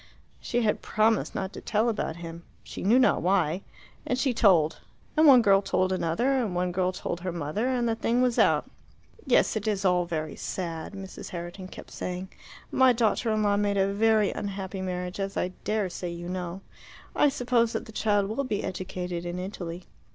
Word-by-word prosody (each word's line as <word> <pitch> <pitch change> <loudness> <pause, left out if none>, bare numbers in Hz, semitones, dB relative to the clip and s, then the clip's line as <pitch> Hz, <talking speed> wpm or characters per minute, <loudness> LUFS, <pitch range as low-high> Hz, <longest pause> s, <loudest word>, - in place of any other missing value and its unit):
She 240 0 -1
had 210 - +1
promised 215 +1 +1
not 190 0 -3
to - - -8
tell 215 +2 +1
about 210 -8 -1
him 170 0 -8 0.2
she - - -8
knew 215 +6 +4
not 260 - +4
why 180 -1 +1 0.4
and 250 - -1
she 260 -1 +1
told. 175 -9 +4 0.4
And 315 0 +6
one 255 -4 +8
girl 195 -2 +5
told 185 -1 0
another, 185 +9 0
and 205 -7 -2
one 180 0 0
girl 185 0 +1
told 175 -2 -4
her 180 +1 -3
mother, 170 - -2
and 250 -2 +1
the 230 - +2
thing 230 +2 0
was 250 -2 +2
out. - - +4 0.6
"Yes, 250 - +3
it 215 0 -2
is 205 -2 0
all 180 -1 +3
very 155 -3 -3
sad," 165 -1 -5
Mrs. 195 -1 -8
Herriton 175 +2 -7
kept - - -11
saying. 180 +1 -5 0.4
"My 260 -1 +5
daughter 230 0 +1
in 215 0 +1
law 205 -1 +3
made 205 -1 +1
a 195 0 +2
very 215 0 +3
unhappy 195 -2 -5
marriage, 180 0 -4
as 195 0 -3
I 180 - 0
dare 210 -2 0
say 180 0 -5
you 170 0 -6
know. 180 0 -4 0.5
I 295 - +5
suppose 245 -4 +1
that - - -3
the - - -11
child 205 -2 +1
will 220 +7 -2
be 215 -6 -2
educated 180 -1 -4
in 175 0 -4
Italy. 180 -2 -6
195 Hz, 195 wpm, -27 LUFS, 180-220 Hz, 0.6 s, one